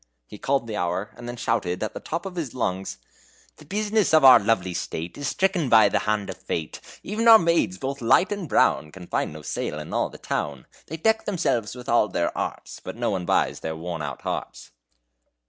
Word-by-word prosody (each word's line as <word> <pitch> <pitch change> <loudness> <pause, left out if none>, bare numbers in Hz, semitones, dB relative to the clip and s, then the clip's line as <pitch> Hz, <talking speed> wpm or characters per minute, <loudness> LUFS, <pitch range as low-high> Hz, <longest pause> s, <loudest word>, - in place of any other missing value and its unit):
He 105 - -12
called 135 -2 0
the 110 -2 -5
hour, 90 +2 -2
and 120 - -10
then 120 - -5
shouted, 95 -6 -1
at 110 - -3
the - - -6
top 165 +4 -4
of 190 -2 -6
his 155 -9 -4
lungs: 95 -5 -2 0.6
The 150 - -15
bus'ness 210 0 +1
of 155 -3 +6
our 130 - +10
lovely 100 -4 0
state 85 0 -5
Is 145 -1 -4
stricken 185 -6 0
by 110 -3 +7
the - - +1
hand 105 -2 0
of - - -10
fate 80 -2 -4 0.2
Even 220 +3 -1
our 225 -1 +11
maids, 170 - +1
both 135 +5 -4
light 120 - +4
and 200 -7 -4
brown, 75 - +2
Can 90 +1 -11
find - - -2
no 75 0 -10
sale 75 - -3
in 75 +1 -7
all - - 0
the - - -12
town; 70 -3 -4 0.2
They 160 - -6
deck 220 +6 +1
themselves 145 - -1
with 125 -1 -10
all 115 -2 +3
their 85 - -1
arts, - - -5
But - - -6
no - - -1
one 90 -3 -3
buys - - +1
their 80 0 -4
worn 85 0 -5
out 70 -3 -6
hearts." - - -5
115 Hz, 215 wpm, -24 LUFS, -, 0.6 s, our